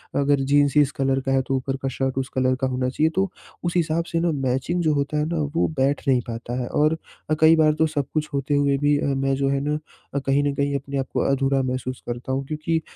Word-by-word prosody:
अगर 140 0 +3
जीन्स 145 0 +4
इस 145 -1 +5
कलर 135 0 +2
का 135 - 0
है 135 - +3
तो 135 - 0
ऊपर 135 +1 -2
का 135 - -1
शर्ट 130 0 -2
उस 135 0 -1
कलर 130 0 +2
का 130 - +2
होना 130 0 -1
चाहिए। 155 +5 +1
तो 195 +1 +1 0.3
उस 175 -1 -1
हिसाब 165 0 +1
से 165 - +1
ना 170 0 +1
मैचिंग 135 +5 -1
जो 155 -2 +3
होता 145 +1 -1
है 150 - +1
ना 170 +1 -2 0.2
वो 170 - +3
बैठ 140 +2 +2
नहीं 130 -2 +4
पाता 120 +1 -5
है। 120 - -3
और 155 +4 +2 0.3
अ, - - +3
कई 160 +1 +7
बार 155 -1 +4
तो 160 +1 +2
सब 145 -3 -2
कुछ 155 -1 -1
होते 140 +1 0
हुए 140 -1 +2
भी 145 +1 +2
अ, - - -1
मैं 135 0 +1
जो 135 0 0
है 140 0 +1
न 150 - +1 0.4
अ, - - +2
कहीं 140 +1 +1
न 145 -1 0
कहीं 140 0 0
अपने 140 0 -3
आप 135 -1 -1
को - - 0
अधूरा 135 0 +2
महसूस 130 0 -3
करता 120 +2 -4
हूँ। 135 +1 -1
क्योंकि 160 +2 -1
140 Hz, 265 wpm, -23 LUFS, 135-150 Hz, 0.4 s, कई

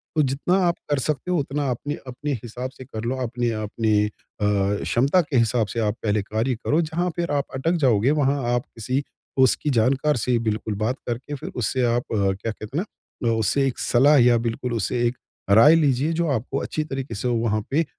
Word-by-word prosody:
तो 155 - +4
जितना 135 +7 0
आप 170 - +1
कर 145 -2 +1
सकते 150 +5 -2
हो 180 - +2
उतना 140 0 -2
अपनी-अपनी 145 +1 -5
हिसाब 125 +2 -5
से 130 -1 -12
कर 110 -1 -7
लो। 125 +3 -1
अपने 120 0 -1
अपनी 105 0 +1
अ, 105 - -2 0.3
क्षमता 105 - +2
के 145 -5 -2
हिसाब 115 -1 +2
से 115 - -4
आप 105 -1 0
पहले 105 -1 +1
कार्य 110 +5 -1
करो। 155 +4 +3
जहाँ 170 +3 -1
फिर 170 -3 -2
आप 145 -1 0
अटक 150 +6 0
जाओगे 120 +3 +3
वहाँ 140 +1 +1
आप 120 0 0
किसी 130 +5 -1 0.3
उसकी 130 +3 +3
जानकार 135 +6 +2
से 120 +2 +1
बिल्कुल 110 -1 -2
बात 110 +5 -1
करके 125 +5 -4
फिर - - -7
उससे 125 +2 0
आप 120 - 0
क्या 100 +1 0
कहते 110 +6 -7
हैं 180 - +1 0.4
ना, 115 - +3
उससे 110 +5 +1
एक 130 - -3
सलाह 140 +5 +4
या 120 -2 +5
बिल्कुल 120 +2 -2
उससे 115 +2 -1
एक 120 +1 -3 0.3
राय 115 +10 +7
लीजिए। 145 -1 +2
जो 170 +1 0
आपको 130 +2 -2
अच्छी 155 - -2
तरीके 135 -2 -5
से 105 - -2
वहाँ 115 -3 +1
पे 160 +3 +2
125 Hz, 200 wpm, -23 LUFS, 115-145 Hz, 0.4 s, राय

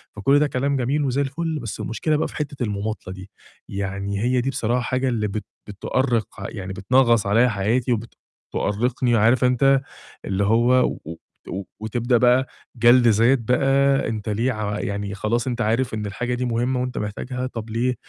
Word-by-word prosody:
فكل 135 +8 +3
ده 150 - +3
كلام 140 +1 0
جميل 140 +4 0
وزي 135 +2 0
الفل، 155 +3 -2
بس 115 - -6
المشكلة 150 +7 -1
بقى - - 0
في - - -12
حتّة 140 -3 -3
المماطلة 100 -3 -4
دي، 95 +1 -11 0.4
يعني 100 0 -3
هي 125 0 +2
دي 135 - -1
بصراحة 120 -1 0
حاجة 130 +2 0
اللي 110 -4 -1
بت 105 +2 -5 0.2
بتؤرّق، 115 +3 -1 0.2
يعني 95 -3 -6
بتنغّص 115 +2 +3
عليَّ 115 +5 +4
حياتي 115 +5 0 0.6
وبتؤرّقني، 120 +3 0
عارف 115 +4 +3
أنت 135 +2 +4 0.4
اللي 100 +1 0
هو 115 +4 +3 0.3
و 80 - -6 0.3
و 95 +1 -4 0.2
وتبدأ 120 +3 0
بقى 125 +2 +4 0.3
جَلد 120 +1 +6
ذات 115 +4 +4
بقى 135 +3 +2
أنت 110 -1 -4
ليه 115 +5 0
ع 105 -2 -3
يعني 100 0 -3
خلاص، 115 +5 -1
أنت 120 -1 -2
عارف 115 +3 0
إن 105 -1 -3
الحاجة 125 +5 -3
دي 125 +1 -2
مهمة 125 +2 0
وأنت 125 0 -4
محتاجها، 125 +5 -4
طّب 115 -3 -7
ليه 125 +3 0
120 Hz, 175 wpm, -22 LUFS, 105-130 Hz, 0.6 s, جَلد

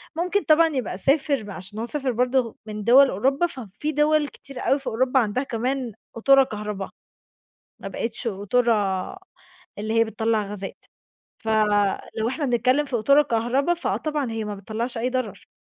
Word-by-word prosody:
ممكن 360 +5 0
طبعًا 320 +1 +5
يبقى 235 -8 -2
سافر 275 +2 +1
بقى 205 -1 -8
عشان 190 +4 -9
هو 230 - -2
سافر 270 +1 -2
برضه 250 0 +1
من 210 -1 -6
دُوَل 260 +5 +7
أوروبا 270 - +1
ففي 260 - -5
دُوَل 300 0 +2
كتير 275 -2 -11
أوي 275 - +3
في 270 - -11
أوروبا 255 +3 +2
عندها 235 +2 0
كمان 250 0 -2 0.2
قطورة 275 +4 +5
كهربا، 210 -4 -5 0.9
ما - - -7
بقِتش 230 +1 -4
قطورة 230 +4 +1 1.0
اللي 215 +2 -3
هي - - +6
بتطلّع 220 0 0
غازات. 200 -1 -8 0.5
فلو 215 0 +1
إحنا 285 +3 -2
بنتكلّم 255 +3 +2
في 270 - -3
قطورة 280 +6 +5
كهربا، 260 +5 +1
فآه 345 - -2
طبعًا 295 -5 -2
هي 225 -1 -3
ما 210 -1 -4
بتطلّعش 225 +5 -4
أي 240 +2 0
ضرر. 255 -6 -4
240 Hz, 160 wpm, -24 LUFS, 215-275 Hz, 1.0 s, دُوَل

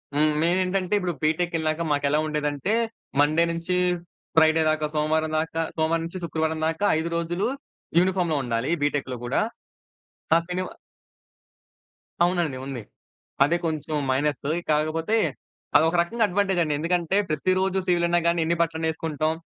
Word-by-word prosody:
హ్మ్. 150 +1 +3
మెయినేంటంటే, 185 +2 +1
ఇప్పుడు 180 -2 -2
బిటెక్కెళ్ళాక 160 0 0
మాకెలా 145 +1 +2
ఉండేదంటే, 150 +5 -1 0.5
మండే 155 +3 +4
నుంచి 170 +2 -2 0.6
ఫ్రైడే 160 0 +5
దాక 155 -1 0
సోమవారం 155 +1 +1
దాకా 165 +1 -2
సోమవారం 165 +1 +1
నుంచి 180 +2 -6
శుక్రవారం 160 0 -1
దాకా 165 +6 -1
5 165 +1 -2
రోజులు 175 +3 -1 0.5
యూనిఫార్మ్‌లో 180 -3 +1
ఉండాలి 115 +3 -1
బిటెక్‌లో 145 -3 -1
కూడా. 125 - 0 1.0
ఆ! - - +6
శనివా 185 +1 -3 1.5
అవునండి. 175 -6 +1
ఉంది. 135 -4 -5 0.6
అదే 170 +5 +2
కొంచెం 155 -1 -2 0.2
మైనస్సు. 145 +1 0 0.2
కాకపోతే, 160 +7 +1 0.6
అది 150 - +7
ఒక 175 - -2
రకంగా 225 +6 +1
అడ్వాంటేజండి. 180 -5 +1
ఎందుకంటే, 175 +3 +1
ప్రతిరోజు 185 +5 +1
సివిల్ 175 -1 +3
అయినా 175 0 +3
గాని 170 -1 +2
ఎన్ని 170 +1 +1
బట్టలనేసుకుంటాం, 160 -1 -1
160 Hz, 125 wpm, -25 LUFS, 155-175 Hz, 1.5 s, అది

